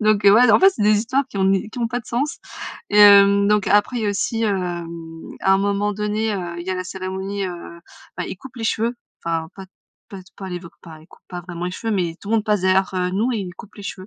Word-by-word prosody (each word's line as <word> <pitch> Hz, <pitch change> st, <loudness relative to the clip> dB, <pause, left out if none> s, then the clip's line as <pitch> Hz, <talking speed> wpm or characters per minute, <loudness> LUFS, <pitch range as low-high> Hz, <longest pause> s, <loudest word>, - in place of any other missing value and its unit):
Donc, 215 Hz, -1 st, +2 dB
heu, 200 Hz, -, +9 dB
ouais, 245 Hz, +1 st, +6 dB
en -, -, +5 dB
fait 385 Hz, -, +8 dB
c'est 220 Hz, -, -4 dB
des 210 Hz, 0 st, +4 dB
histoires 265 Hz, +5 st, 0 dB
qui 200 Hz, -, -6 dB
ont 190 Hz, -, +2 dB
ni 195 Hz, +2 st, +1 dB
qui 245 Hz, -, -8 dB
ont 230 Hz, -, 0 dB
pas 245 Hz, 0 st, -2 dB
de -, -, -22 dB
sens. 275 Hz, +6 st, -2 dB, 0.5 s
Et, 210 Hz, -, +3 dB
hem, 200 Hz, 0 st, +7 dB
donc 210 Hz, -1 st, +2 dB
après, 210 Hz, +4 st, +3 dB
il -, -, -3 dB
y -, -, 0 dB
a -, -, +2 dB
aussi, 215 Hz, +3 st, -1 dB
hem, 170 Hz, -4 st, -4 dB, 0.2 s
à 190 Hz, -, +3 dB
un -, -, +2 dB
moment 200 Hz, +1 st, 0 dB
donné, 210 Hz, +1 st, -1 dB
heu, 175 Hz, -2 st, -5 dB
il 175 Hz, -, -9 dB
y -, -, -2 dB
a -, -, 0 dB
la 185 Hz, 0 st, -4 dB
cérémonie, 190 Hz, +1 st, -4 dB
heu 170 Hz, -1 st, -8 dB, 0.4 s
enfin 180 Hz, -, -3 dB
ils -, -, -6 dB
coupent 260 Hz, +4 st, -13 dB
les 225 Hz, -, -5 dB
cheveux. 230 Hz, +2 st, 0 dB, 0.3 s
Enfin 165 Hz, -1 st, -2 dB
pas 190 Hz, -1 st, -9 dB
t 185 Hz, -, -44 dB, 0.4 s
pas 195 Hz, -, -9 dB
t 185 Hz, -, -23 dB
pas 190 Hz, -1 st, -7 dB
les 180 Hz, -1 st, -4 dB
voc 170 Hz, -, -12 dB
pas 160 Hz, -2 st, -11 dB
ils 155 Hz, -, -18 dB
coupent -, -, -20 dB
pas 180 Hz, -1 st, -6 dB
vraiment 175 Hz, 0 st, -6 dB
les -, -, -3 dB
cheveux, 225 Hz, +3 st, -3 dB
mais 175 Hz, -4 st, -1 dB
tout 200 Hz, -, -10 dB
le 225 Hz, -, +3 dB
monde 215 Hz, -, 0 dB
passe 210 Hz, -3 st, +1 dB
derrière 190 Hz, +1 st, +2 dB
heu, 180 Hz, 0 st, 0 dB
nous 225 Hz, +7 st, 0 dB
et 225 Hz, -, -1 dB
ils 180 Hz, -2 st, -6 dB
coupent 205 Hz, -, -13 dB
les 205 Hz, -, -10 dB
cheveux, 185 Hz, -1 st, -7 dB
200 Hz, 295 wpm, -21 LUFS, 180-215 Hz, 0.5 s, heu